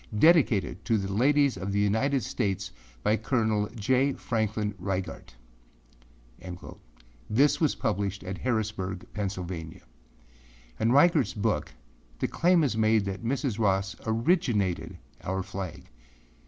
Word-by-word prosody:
Dedicated 150 - +4
to 115 -2 +2
the 95 -1 -3
Ladies 140 +2 +3
of 95 +2 -4
the 100 - +1
United 115 +7 +1
States 100 -4 -2 0.3
by 110 - +3
Col. 110 -3 0
J. 130 +5 +2
Franklin 110 -2 -1
Reigart.â - - -9 0.5
This 140 +10 +3
was 155 - +2
published 100 -2 -2
at 95 0 -5
Harrisburg, 105 -6 -2
Pennsylvania. 90 -5 -5 1.0
In 110 - +2
Reigartâs 145 - +4
book, 100 - 0 0.5
the - - -1
claim 175 -1 +3
is 130 -6 +1
made 110 -1 +3
that 100 +2 -4
Mrs. 125 -2 -1
Ross 95 -2 +1
âoriginatedâ 110 - 0 0.3
our 95 +1 -2
flag. 95 -2 -7
105 Hz, 115 wpm, -28 LUFS, 95-120 Hz, 1.0 s, Dedicated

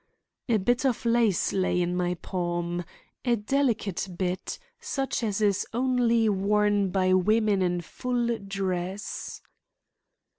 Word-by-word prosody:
A 230 - +4
bit 245 +6 +1
of 260 -2 0
lace 230 -5 +2
lay 185 -2 +1
in 175 0 0
my 180 0 0
palm, 175 -1 -2 0.4
a 240 -2 +3
delicate 220 -5 0
bit, 185 0 -2 0.2
such 280 - -2
as 215 -2 -1
is 200 -2 +2
only 240 -2 +2
worn 205 0 +2
by 185 0 +2
women 210 +1 +3
in 175 -1 +1
full 240 +6 -1
dress. 195 0 -4
205 Hz, 120 wpm, -27 LUFS, 185-235 Hz, 0.4 s, A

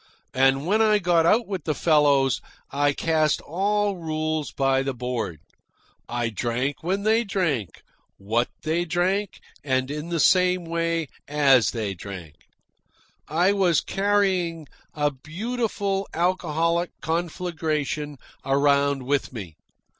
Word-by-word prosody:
And 135 +2 +3
when 210 +5 +2
I 215 -1 +4
got 170 -4 +2
out 225 +6 +4
with 190 -6 -5
the 155 - 0
fellows, 145 -5 +3 0.3
I 145 +1 +2
cast 155 +1 +1
all 200 +4 0
rules 155 -2 -2
by 135 -1 +1
the 135 -1 -3
board. 120 -8 -3 0.7
I 120 -1 -1
drank 120 +5 -2
when 190 +4 -1
they 220 +2 +3
drank, 170 - -2 0.3
what 115 +5 0 0.2
they 160 +2 0
drank, 180 +3 -1 0.2
and 130 -1 0
in 150 +3 -5
the 170 -1 -1
same 180 +1 +3
way 165 0 -1 0.2
they 130 -8 +3
drank. 90 -4 -9 0.9
I 175 +6 +2
was 185 -5 +3
carrying 190 -5 0 0.3
a 145 -1 +1
beautiful 200 - -3
alcoholic 170 -1 0
conflagration 160 -3 -2 0.3
around 140 0 +2
with 140 +2 -1
me. 95 -10 -8
155 Hz, 120 wpm, -24 LUFS, 135-180 Hz, 0.9 s, I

